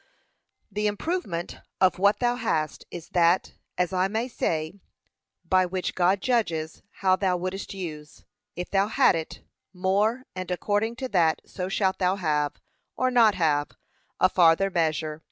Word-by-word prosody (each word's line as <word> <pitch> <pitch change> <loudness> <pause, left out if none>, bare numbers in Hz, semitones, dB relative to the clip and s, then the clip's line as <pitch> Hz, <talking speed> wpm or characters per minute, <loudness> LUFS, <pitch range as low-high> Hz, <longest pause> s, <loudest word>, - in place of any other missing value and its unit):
The 210 +1 0
improvement 205 - -3 0.2
of 185 -1 +3
what 200 +2 +4
thou 240 0 +2
hast 160 -11 -2
is 170 -2 -9
that, 175 +1 +2 0.2
as 180 +1 0
I 185 +1 +2
may 220 +4 -2
say, 160 -6 -2 0.7
by 185 -1 +3
which 185 0 -3
God 185 +2 +2
judges 170 -11 -1 0.2
how 185 0 +6
thou 185 -2 0
wouldest 185 +2 -5
use, 155 -5 -8 0.3
if 180 - -6
thou 195 0 +2
had 255 +2 +4
it, 160 -1 -5 0.3
more; 205 +7 +1
and 185 0 -5
according 205 +5 -1
to 260 +1 -4
that 165 -5 +2
so 185 -1 -5
shalt 190 -1 0
thou 185 0 +2
have, 150 -6 0 0.4
or 255 0 +1
not 230 -4 +5
have, 150 -4 +1 0.5
a - - +6
farther 185 +1 +4
measure. 155 -3 -1
185 Hz, 155 wpm, -26 LUFS, 170-205 Hz, 0.7 s, how